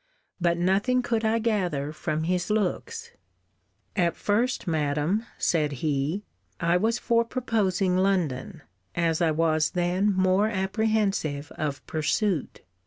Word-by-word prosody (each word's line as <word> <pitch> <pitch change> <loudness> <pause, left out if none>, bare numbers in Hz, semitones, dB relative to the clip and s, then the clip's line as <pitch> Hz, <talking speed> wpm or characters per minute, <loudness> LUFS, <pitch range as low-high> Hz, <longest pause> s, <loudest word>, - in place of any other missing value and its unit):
But 170 -1 +2
nothing 200 +8 +2
could 230 -2 0
I 220 +1 +2
gather 180 -11 -1
from 155 0 -2
his 180 +2 -1
looks. 455 - -2 0.8
At 175 -4 +1
first, 235 +5 0
Madam, 155 +7 0
said 150 -4 +1
he, 150 +7 0 0.4
I 170 +1 +2
was 225 +6 +2
for 235 -1 +2
proposing 205 -7 0
London, 185 -3 0 0.3
as 165 -1 +1
I 170 - +4
was 155 0 +2
then 180 +4 +2
more 190 +2 +3
apprehensive 195 -7 0
of 145 -3 -4
pursuit. 160 +2 -1
185 Hz, 120 wpm, -26 LUFS, 160-215 Hz, 0.8 s, I